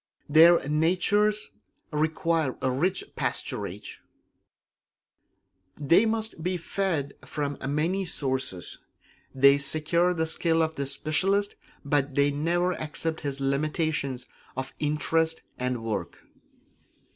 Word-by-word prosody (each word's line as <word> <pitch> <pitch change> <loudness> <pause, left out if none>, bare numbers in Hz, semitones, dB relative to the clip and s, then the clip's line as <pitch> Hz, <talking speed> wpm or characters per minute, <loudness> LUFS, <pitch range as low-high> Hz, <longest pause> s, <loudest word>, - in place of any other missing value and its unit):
Their 160 0 +6
natures 185 +7 +1 0.4
require 160 -1 0
rich 145 +9 0
pasturage; - - -4 1.8
they 170 +10 +4
must 220 -5 -3
be 180 +2 -1
fed 170 -5 -2
from 145 -2 -4
many 170 +7 0
sources. 130 - -2 0.6
They 140 +1 +6
secure 160 +5 +2
the 160 -1 0
skill 165 0 +2
of 160 0 -2
the 140 -1 -3
specialist, 195 +8 0 0.3
but 140 -1 0
they 140 0 +3
never 170 +5 +1
accept 160 0 -2
his 140 -2 -4
limitations 140 -1 -1 0.3
of 130 0 -4
interest 160 +2 0 0.2
and 125 -2 -2
work. 105 -7 -3
155 Hz, 100 wpm, -27 LUFS, 140-175 Hz, 1.8 s, Their